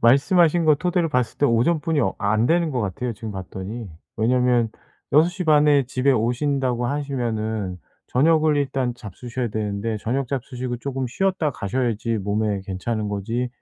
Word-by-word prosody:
말씀하신 165 Hz, -, +4 dB
거 155 Hz, -1 st, +6 dB
토대로 175 Hz, +1 st, 0 dB
봤을 125 Hz, -4 st, -1 dB
때 145 Hz, -, +4 dB
오전뿐이 150 Hz, +6 st, +2 dB
어 -, -, 0 dB
안 110 Hz, +3 st, +2 dB
되는 170 Hz, -1 st, +2 dB
것 125 Hz, -3 st, -1 dB
같아요 110 Hz, +5 st, -2 dB
지금 110 Hz, 0 st, -7 dB
봤더니. 95 Hz, +4 st, -6 dB, 0.3 s
왜냐하면 120 Hz, 0 st, +2 dB, 0.4 s
6 155 Hz, +4 st, +6 dB
시 180 Hz, 0 st, -5 dB
반에 150 Hz, -3 st, +5 dB
집에 130 Hz, +2 st, +1 dB
오신다고 125 Hz, +1 st, 0 dB
하시면은 110 Hz, -9 st, -2 dB, 0.3 s
저녁을 155 Hz, +2 st, +3 dB
일단 135 Hz, -3 st, -1 dB
잡수셔야 120 Hz, +3 st, -5 dB
되는데 105 Hz, +1 st, -2 dB
저녁 130 Hz, +6 st, -1 dB
잡수시고 125 Hz, -2 st, -4 dB
쪼금 135 Hz, 0 st, -3 dB
쉬었다 185 Hz, +1 st, 0 dB
가셔야지 115 Hz, -1 st, -1 dB
몸에 105 Hz, 0 st, -1 dB
괜찮은 105 Hz, +3 st, -3 dB
거지 115 Hz, +5 st, -2 dB
125 Hz, 350 characters per minute, -23 LUFS, 110-145 Hz, 0.4 s, 거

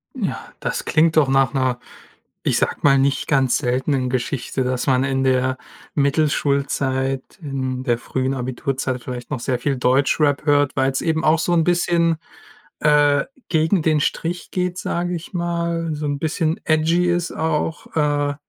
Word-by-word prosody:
Ja, -, -, -4 dB
das -, -, -3 dB
klingt 160 Hz, +1 st, +2 dB
doch 150 Hz, -4 st, +5 dB
nach 135 Hz, 0 st, +3 dB
'ner- 130 Hz, -2 st, +1 dB, 0.7 s
ich -, -, +2 dB
sag -, -, -1 dB
mal- 140 Hz, -1 st, +5 dB
nicht 135 Hz, +1 st, +1 dB
ganz 135 Hz, -3 st, +3 dB
seltenen 130 Hz, 0 st, 0 dB
Geschichte, 130 Hz, +1 st, -2 dB
dass 125 Hz, 0 st, -1 dB
man 130 Hz, 0 st, +3 dB
in 135 Hz, -1 st, 0 dB
der 130 Hz, 0 st, +2 dB, 0.4 s
Mittelschulzeit, 140 Hz, -2 st, 0 dB, 0.2 s
in 130 Hz, -4 st, -3 dB
der 120 Hz, -3 st, +1 dB
frühen 130 Hz, +2 st, -2 dB
Abiturzeit 130 Hz, 0 st, -3 dB
vielleicht 125 Hz, -1 st, -7 dB
noch 145 Hz, -, -2 dB
sehr 125 Hz, +1 st, -1 dB
viel 140 Hz, +1 st, 0 dB
Deutschrap 140 Hz, +3 st, +2 dB
hört, 145 Hz, -2 st, +3 dB
weil's 135 Hz, -1 st, +1 dB
eben 160 Hz, -1 st, 0 dB
auch 155 Hz, +1 st, +4 dB
so 170 Hz, +2 st, 0 dB
'n 165 Hz, -1 st, +3 dB
bisschen, 170 Hz, -1 st, +2 dB, 0.6 s
äh, 145 Hz, -1 st, +4 dB, 0.2 s
gegen 160 Hz, +2 st, +2 dB
den 155 Hz, -1 st, +2 dB
Strich 170 Hz, +4 st, -2 dB
geht, 180 Hz, -1 st, -2 dB
sage 175 Hz, 0 st, -2 dB
ich 170 Hz, 0 st, -7 dB
mal, 170 Hz, -1 st, -1 dB
so 150 Hz, 0 st, -4 dB
'n 145 Hz, -1 st, -1 dB
bisschen 160 Hz, +1 st, -1 dB
edgy 165 Hz, +3 st, +2 dB
ist 175 Hz, -1 st, 0 dB
auch, 160 Hz, 0 st, -2 dB
äh, 145 Hz, -1 st, +1 dB
145 Hz, 160 wpm, -21 LUFS, 130-160 Hz, 0.7 s, doch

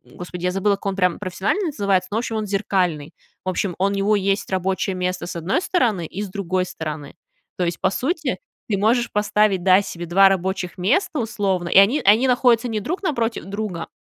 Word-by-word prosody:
Господи, 180 Hz, 0 st, -8 dB
я 180 Hz, -, +1 dB
забыла, 200 Hz, +2 st, +1 dB
как 200 Hz, -, -17 dB
он 195 Hz, -1 st, -1 dB
прям 180 Hz, -2 st, +1 dB
профессионально 205 Hz, -, -1 dB
называется, 200 Hz, -, 0 dB
ну, 215 Hz, -, -1 dB
в -, -, +2 dB
общем, 230 Hz, -2 st, -4 dB
он 215 Hz, -, -2 dB
зеркальный. 180 Hz, -6 st, -1 dB, 0.3 s
В 185 Hz, -, -2 dB
общем, 185 Hz, 0 st, -1 dB
он 200 Hz, +1 st, +1 dB
у -, -, -2 dB
него 205 Hz, +2 st, +2 dB
есть 195 Hz, 0 st, 0 dB
рабочее 190 Hz, 0 st, -1 dB
место 180 Hz, 0 st, -2 dB
с 175 Hz, -, -6 dB
одной 175 Hz, -, 0 dB
стороны 220 Hz, -, +1 dB
и 195 Hz, +6 st, -6 dB
с 205 Hz, -, -4 dB
другой 185 Hz, -1 st, -1 dB
стороны. 150 Hz, -4 st, -7 dB, 0.4 s
То 180 Hz, -, 0 dB
есть, 170 Hz, 0 st, -3 dB
по 190 Hz, -, +3 dB
сути, 295 Hz, -, -2 dB, 0.3 s
ты 200 Hz, -, +1 dB
можешь 235 Hz, +4 st, +1 dB
поставить, 210 Hz, -2 st, +1 dB
да, 190 Hz, +1 st, +6 dB
себе 175 Hz, -3 st, -6 dB
2 195 Hz, +3 st, +5 dB
рабочих 190 Hz, -1 st, -2 dB
места, 275 Hz, -, +1 dB
условно, 200 Hz, -6 st, -1 dB
и -, -, +3 dB
они 225 Hz, +10 st, +4 dB
они 220 Hz, +6 st, +5 dB
находятся 245 Hz, -1 st, +3 dB
не 215 Hz, -2 st, -2 dB
друг 360 Hz, -, -3 dB
напротив 235 Hz, -, -1 dB
друга, 200 Hz, -4 st, -4 dB
195 Hz, 210 wpm, -21 LUFS, 180-215 Hz, 0.4 s, да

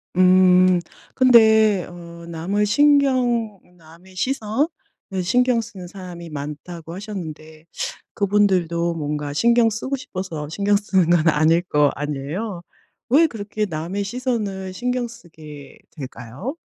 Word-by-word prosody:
음 185 Hz, 0 st, +5 dB, 0.4 s
근데 220 Hz, -6 st, +5 dB
어 170 Hz, -1 st, -11 dB
남을 190 Hz, +6 st, -1 dB
신경 250 Hz, -5 st, +2 dB, 0.2 s
"남의 170 Hz, +3 st, -18 dB
시선을 255 Hz, -, 0 dB, 0.6 s
신경 250 Hz, +5 st, +2 dB
쓰는 210 Hz, -6 st, -8 dB
사람이 175 Hz, -2 st, -9 dB
많다."고 155 Hz, +3 st, -7 dB
하셨는데 160 Hz, -6 st, -8 dB, 0.5 s
그분들도 185 Hz, -5 st, +1 dB
뭔가 150 Hz, -2 st, -4 dB
신경 235 Hz, +6 st, +3 dB
쓰고 260 Hz, +6 st, -3 dB
싶어서 175 Hz, -, -6 dB
신경 200 Hz, +4 st, +1 dB
쓰는 190 Hz, -4 st, +1 dB
건 170 Hz, -1 st, +3 dB
아닐 160 Hz, +3 st, +3 dB
거 150 Hz, -4 st, +2 dB
아니에요? 150 Hz, +7 st, -4 dB, 0.5 s
왜 300 Hz, +6 st, +6 dB
그렇게 215 Hz, -5 st, -3 dB
남의 175 Hz, +3 st, -4 dB
시선을 205 Hz, -4 st, -3 dB
신경 250 Hz, +3 st, -2 dB
쓰게 155 Hz, -10 st, -13 dB
될까요? 135 Hz, -, -7 dB
185 Hz, 245 characters per minute, -21 LUFS, 165-220 Hz, 0.6 s, 왜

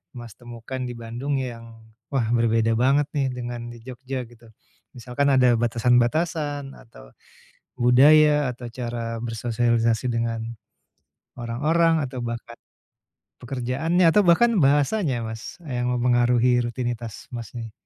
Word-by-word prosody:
Mas, 120 Hz, -3 st, -9 dB
temukan 120 Hz, +2 st, -8 dB
di 120 Hz, -, -7 dB
Bandung 120 Hz, +5 st, -3 dB
yang, 115 Hz, -3 st, -7 dB, 0.2 s
wah 135 Hz, -4 st, 0 dB
berbeda 115 Hz, -1 st, +2 dB
banget 135 Hz, +5 st, +3 dB
nih 140 Hz, -2 st, +1 dB
dengan 120 Hz, -1 st, -6 dB
di 120 Hz, -, -10 dB
Jogja 130 Hz, 0 st, -6 dB
gitu? 115 Hz, 0 st, -18 dB, 0.5 s
Misalkan 125 Hz, +4 st, -1 dB
ada 130 Hz, -3 st, +4 dB
batasan-batasan, 135 Hz, +5 st, 0 dB
atau -, -, -16 dB, 0.7 s
budaya, 145 Hz, +3 st, +5 dB
atau 120 Hz, 0 st, -9 dB
cara 115 Hz, -1 st, -5 dB
bersosialisasi 115 Hz, +1 st, 0 dB
dengan, 115 Hz, 0 st, -3 dB, 0.8 s
orang-orang 155 Hz, +7 st, +1 dB
atau 130 Hz, -1 st, -5 dB
bahkan 120 Hz, 0 st, -6 dB, 0.8 s
pekerjaannya 135 Hz, +8 st, 0 dB
atau 185 Hz, +6 st, +5 dB
bahkan 225 Hz, +7 st, +4 dB
bahasanya 145 Hz, -, +2 dB
Mas, 110 Hz, +10 st, -8 dB
yang 125 Hz, -3 st, -2 dB
mempengaruhi 125 Hz, 0 st, +2 dB
rutinitas 120 Hz, -2 st, -5 dB
Mas 120 Hz, -1 st, -6 dB
nih? 115 Hz, -2 st, -7 dB
120 Hz, 120 wpm, -23 LUFS, 115-135 Hz, 0.8 s, budaya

